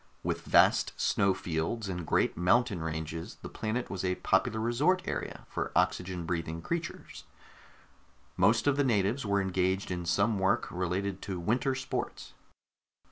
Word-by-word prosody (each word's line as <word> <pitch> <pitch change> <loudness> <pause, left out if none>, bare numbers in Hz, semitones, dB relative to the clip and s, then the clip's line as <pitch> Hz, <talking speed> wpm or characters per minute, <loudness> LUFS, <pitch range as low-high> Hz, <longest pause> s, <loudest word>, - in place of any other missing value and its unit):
With - - -1
its - - -18
vast - - +5
snow 100 -1 +2
fields 85 +7 -2
and 90 -4 -4
great - - +2
mountain 100 +2 +2
ranges, 80 0 -4
the - - -6
planet 110 +3 -3
was 95 -1 -3
a 90 -1 +1
popular 110 +5 +1
resort 145 +12 +2
area - - -4
for - - -3
oxygen 90 -1 0
breathing 85 -1 -2
creatures; 165 - -5 1.1
most 110 +5 +3
of 145 -1 +3
the 145 - +3
natives 115 +1 +1
were 100 0 +2
engaged 95 0 0
in 90 -1 -3
some 100 +6 +2
work 95 0 +2
related 95 +2 -2
to 95 -3 -4
winter 125 +9 +1
sports. 130 0 -4
95 Hz, 150 wpm, -30 LUFS, 90-115 Hz, 1.1 s, vast